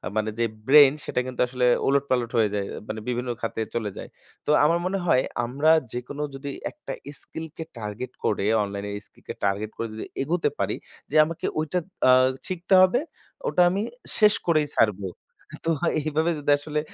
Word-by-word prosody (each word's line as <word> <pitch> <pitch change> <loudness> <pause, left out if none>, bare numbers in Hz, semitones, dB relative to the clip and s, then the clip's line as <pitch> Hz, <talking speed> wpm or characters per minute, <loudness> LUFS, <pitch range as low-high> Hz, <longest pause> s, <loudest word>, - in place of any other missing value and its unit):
মানে, 110 0 0
যে 115 - +3 0.2
ব্রেইন 145 -1 +8
সেটা - - -1
কিন্তু 125 - -3
আসলে 125 0 0 0.2
ওলটপালট 130 -4 +1
হয়ে 110 -2 +4
যায় 100 -1 -1 0.2
মানে 110 0 -4
বিভিন্ন 125 0 -2
খাতে 115 0 -2
চলে 110 -3 -1
যায়। - - -7 0.4
তো - - -4 0.2
আমার 170 +2 +3
মনে 195 +2 0
হয় 130 -6 +4 0.2
আমরা 140 +6 +1 0.2
যেকোনো 125 +4 -5
যদি 140 +1 -6 0.2
একটা 300 - -9 0.3
স্কিলকে 160 0 -7
টার্গেট 105 +3 -5
করে 100 -1 +1 0.2
অনলাইন 100 0 -5 0.2
স্কিলকে - - -10
টার্গেট 100 +2 0
করে 115 - -2
যদি 110 - -6 0.2
এগোতে 165 +5 +1
পারি। - - 0 0.4
যে - - -3
আমাকে 165 +1 -5
ওইটা 160 +4 0 0.3
আ - - +9 0.4
শিখতে 180 +1 -2
হবে 185 +7 +5 0.5
ওটা - - +2
আমি 195 +3 -1 0.4
শেষ 210 -1 +7
করেই 155 -3 +3
ছাড়ব। 105 -3 +3 0.6
তো 165 - +2 0.3
এইভাবে 155 +3 0
যদি 145 0 +1
আসলে 150 +1 -2
135 Hz, 165 wpm, -25 LUFS, 115-160 Hz, 0.6 s, আ